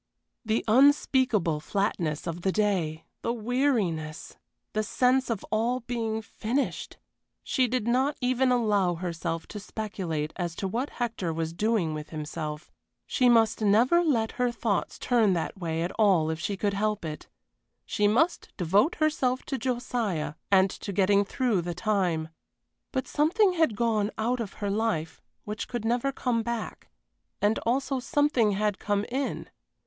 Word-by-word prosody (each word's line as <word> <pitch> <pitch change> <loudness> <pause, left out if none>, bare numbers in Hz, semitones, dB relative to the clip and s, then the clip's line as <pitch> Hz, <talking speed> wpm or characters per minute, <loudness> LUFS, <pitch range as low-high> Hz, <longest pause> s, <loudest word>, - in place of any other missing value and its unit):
The 220 0 0
unspeakable 250 - +4
flatness 170 -4 -1
of 170 +1 -4
the 190 - +1
day! 185 -7 0 0.2
The - - -1
weariness! 220 - -1 0.4
The 215 - +1
sense 255 +4 +2
of 225 -4 -2
all 235 +4 +1
being 225 -2 -3
finished! 240 +6 -3 0.5
She 255 -2 +1
did 245 -2 -1
not 260 +4 +2
even 255 0 +2
allow 205 -7 +2
herself 165 -1 -3
to 210 - -6
speculate 190 -8 -4
as 175 -3 -3
to 195 - -2
what 240 +8 -2
Hector 225 -8 -2
was 160 0 -3
doing 210 -4 +1
with 150 0 -6
himself. 155 -1 -5 0.3
She 250 -1 +3
must 225 -2 +4
never 235 +12 +4
let 235 -9 +1
her 245 -1 +2
thoughts 225 -4 -1
turn 225 -6 +3
that 175 +3 -3
way 165 -2 -2
at 175 - -2
all 180 -7 +4
if 160 - -4
she 195 +4 -2
could 200 0 0
help 210 -1 -1
it. 155 -1 -6 0.6
She 210 - +1
must 290 +12 +1
devote 195 - +3
herself 270 -5 +1
to 270 - -4
Josiah 235 - -2 0.2
and 190 -1 +4
to 200 - -6
getting 200 +1 +3
through 220 -2 0
the 170 0 -4
time. 180 -6 0 0.6
But 260 -1 -2
something 365 +6 +3
had 320 -10 +2
gone 215 -2 +1
out 240 +3 0
of 215 -5 -4
her 205 -1 -3
life 200 -7 -1 0.2
which 210 +1 -5
could 240 -3 -4
never 240 +4 +1
come 245 -4 0
back, 235 -1 -5 0.5
and 205 +2 +2
also 265 +2 +1
something 265 -6 +2
had 205 0 0
come 205 0 0
in. 270 +3 -3
215 Hz, 155 wpm, -27 LUFS, 185-245 Hz, 0.6 s, unspeakable